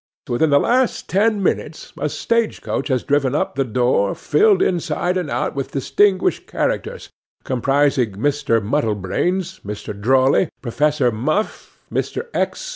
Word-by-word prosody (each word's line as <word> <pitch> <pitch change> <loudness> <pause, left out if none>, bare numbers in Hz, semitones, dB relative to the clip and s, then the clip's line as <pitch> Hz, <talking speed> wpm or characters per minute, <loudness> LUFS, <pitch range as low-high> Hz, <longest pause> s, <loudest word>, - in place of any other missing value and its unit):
Within 150 +6 +1
the 140 - +5
last 250 - +1
ten 205 +1 +2
minutes 160 -3 -2
a 150 - -1
stage 230 +7 -1
coach - - -2
has 130 -4 0
driven 140 -2 +1
up - - -1
to 135 - 0
the 130 - -10
door, 120 -4 +1
filled 420 -2 +3
inside 180 0 -1
and 180 -4 -2
out - - -1
with 135 -1 -5
distinguished 190 +7 +1
characters, - - -3 0.3
comprising 135 -3 +1
Mr. 115 -1 0
Muddlebranes, 150 - -1
Mr. 105 0 -6
Drawley, 130 - +2
Professor 145 +1 +1
Muff, 155 - -2 0.2
Mr. - - -2
X. - - -2
145 Hz, 140 wpm, -20 LUFS, 125-185 Hz, 0.3 s, the